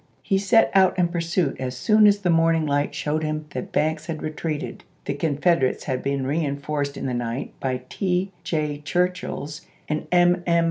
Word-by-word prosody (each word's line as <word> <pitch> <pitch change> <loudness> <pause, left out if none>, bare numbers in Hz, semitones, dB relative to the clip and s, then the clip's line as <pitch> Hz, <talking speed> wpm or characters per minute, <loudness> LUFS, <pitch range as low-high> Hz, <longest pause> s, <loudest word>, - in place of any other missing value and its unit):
He 195 -2 +1
set 225 +3 +4
out 190 -1 +4
in 175 -2 +2
pursuit, 170 -3 -1
as 130 -1 -4
soon 215 - +5
as 205 0 +5
the 185 -4 0
morning 165 -1 +3
light 145 0 0
showed 155 +1 -1
him 155 0 -2
that - - -5
Banks 155 +1 0
had 160 -2 -4
re 155 - -2
treated. 155 -1 -4 0.2
The - - -1
Confederates 145 -1 +1
had 130 -2 -2
been 140 -1 -1
reeuforced 140 -1 -2
in - - -4
the 130 - -1
night 120 +1 -3
by 130 -1 -2
T. 185 +6 -1
J. 155 -4 -2
Churchill's 175 -2 -2 0.3
and 155 0 -2
M. 175 0 +4
M. 170 0 +4
155 Hz, 185 wpm, -24 LUFS, 140-175 Hz, 0.3 s, soon